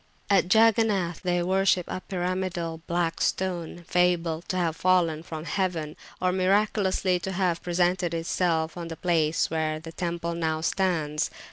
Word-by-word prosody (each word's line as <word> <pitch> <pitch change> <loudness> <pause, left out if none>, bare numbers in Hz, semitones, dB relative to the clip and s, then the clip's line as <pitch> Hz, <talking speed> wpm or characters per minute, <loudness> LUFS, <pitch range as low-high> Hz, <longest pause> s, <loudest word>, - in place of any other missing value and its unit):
At 190 -2 +3
Jagannath 220 -6 +3
they 175 -1 0
worship 190 -1 +2
a 185 - -4
pyramidal 180 -3 -3
black 170 -1 -1
stone, 175 -2 -2
fabled 175 -2 +1
to 185 - -1
have 170 -3 0
fallen 170 -3 +2
from 160 -2 -7
heaven, 165 -3 -2 0.2
or 185 0 +1
miraculously 190 -1 +1
to 190 +2 -4
have 180 -3 0
presented 175 0 +1
itself 165 -1 0
on 170 -1 -6
the 165 -1 -7
place 165 -3 +1
where 155 -1 -1
the 165 +1 -9
temple 170 0 -3
now 160 -2 -1
stands. 160 -3 0
175 Hz, 145 wpm, -26 LUFS, 165-185 Hz, 0.2 s, At